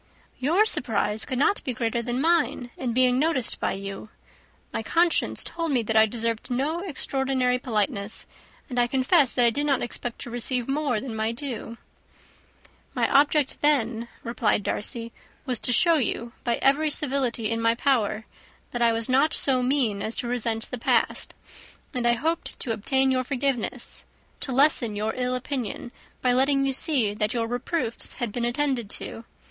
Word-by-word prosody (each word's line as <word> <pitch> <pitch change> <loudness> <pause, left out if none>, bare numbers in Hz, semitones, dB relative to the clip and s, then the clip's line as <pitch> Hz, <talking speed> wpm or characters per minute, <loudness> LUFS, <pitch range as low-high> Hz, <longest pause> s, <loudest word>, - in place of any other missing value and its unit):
"Your 335 +11 +3
surprise 220 - +1
could 260 - -3
not 295 +9 +2
be 255 - -2
greater 235 0 -1
than 240 +1 -3
mine 300 -6 +1
in 250 -2 -3
being 250 +1 +3
noticed 295 -5 +1
by - - -1
you. 195 +2 -7 0.6
My - - -2
conscience 335 +9 +2
told 335 -2 -3
me 250 -4 +1
that 225 +1 -2
I 220 0 +6
deserved 230 0 -3
no 280 +7 -1
extraordinary 265 -7 -1
politeness, 215 -3 -1 0.4
and 245 -3 -2
I 240 - +3
confess 265 +2 +3
that 245 - +4
I 235 - +4
did 290 +5 -2
not 275 -3 +1
expect 240 0 -5
to 240 - -7
receive 245 0 -1
more 275 -4 0
than 235 -1 -6
my 220 +1 -1
due." 235 -2 -6 1.2
"My - - +2
object 285 0 +3
then," 235 -6 +1 0.2
replied 230 -3 0
Darcy, 230 +3 +2 0.3
"was 250 -4 -1
to - - -1
show 335 +6 +5
you, 235 -3 -1
by 235 -1 +1
every 295 +3 +3
civility 260 -7 0
in 230 0 -1
my 230 0 +3
power, 225 -5 0 0.5
that 240 - -4
I 230 -1 +4
was 225 0 -2
not 270 +4 +4
so 260 -2 +2
mean 250 -6 +1
as 220 - -2
to 240 - -3
resent 230 -2 -2
the 250 - -4
past; - - +1 0.6
and 245 -2 -1
I 235 - +4
hoped 320 +8 -2
to 245 - -1
obtain 265 +5 +1
your 255 0 +1
forgiveness, 265 -2 -1 0.3
to 270 - -4
lessen 255 -5 +3
your 215 +2 -2
ill 250 0 -1
opinion, 255 0 -4 0.3
by 250 -1 +3
letting 275 +2 +2
you 270 - 0
see 260 -8 +2
that 210 +2 -1
your 230 -1 0
reproofs 245 +1 -2
had 240 -3 -4
been 235 +2 -2
attended 245 -3 -1
to. 225 - -7
250 Hz, 175 wpm, -25 LUFS, 230-275 Hz, 1.2 s, I